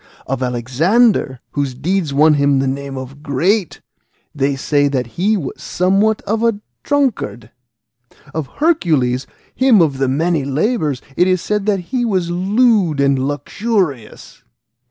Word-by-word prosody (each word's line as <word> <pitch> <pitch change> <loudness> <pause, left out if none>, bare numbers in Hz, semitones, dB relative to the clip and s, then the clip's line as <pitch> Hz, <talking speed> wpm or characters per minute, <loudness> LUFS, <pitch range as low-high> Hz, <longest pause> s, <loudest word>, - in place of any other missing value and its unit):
Of 135 0 -3
Alexander, 130 - +1
whose 140 -3 -2
deeds 165 +3 -1
won 150 +3 +4
him 140 -1 +2
the 135 - +1
name 135 0 -4
of 130 +2 -8
Great, 165 +7 0 0.5
they 140 -1 0
say 145 +1 +1
that 130 -3 -1
he 195 - 0
was 145 -8 -6
somewhat 195 +4 +1
of 220 +2 -1
a 230 -3 +1 0.2
drunkard. 275 - -1 0.8
Of 155 -3 -3
Hercules, 155 - +1 0.3
him 255 -5 +4
of 145 -6 +2
the 135 - +1
many 155 +3 0
labours, 150 - -1
it 180 - +3
is 185 -1 +2
said 210 +3 -2
that 200 -2 +2
he 250 -2 +1
was 185 -7 0
lewd 195 - +2
and 140 -1 +2
luxurious. 145 - -3
155 Hz, 140 wpm, -17 LUFS, 135-205 Hz, 0.8 s, won